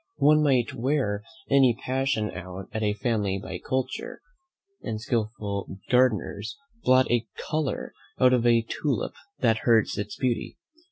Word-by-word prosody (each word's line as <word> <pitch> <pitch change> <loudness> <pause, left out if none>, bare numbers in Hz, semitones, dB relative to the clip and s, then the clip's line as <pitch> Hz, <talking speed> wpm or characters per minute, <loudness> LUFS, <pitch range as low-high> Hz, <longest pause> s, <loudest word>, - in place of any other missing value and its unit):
One 150 +1 +5
might 130 -5 +2
wear 120 -5 0 0.3
any 130 -4 +4
passion 130 -5 0
out 90 +1 -8
of 110 - -2
a 105 -1 +1
family 105 -3 0
by 95 -1 -6
culture, 130 +5 -3 0.6
as 110 0 -4
skilful 105 -4 -2
gardeners 110 -4 +1 0.2
blot 130 - +4
a 120 -1 +1
colour 155 -3 -2 0.3
out 130 -1 +6
of 120 -1 +3
a 115 -1 +4
tulip 130 0 -2 0.3
that 115 -3 +3
hurts 115 -4 +3
its 105 - -4
beauty. 125 -3 -1
115 Hz, 135 wpm, -26 LUFS, 105-130 Hz, 0.6 s, out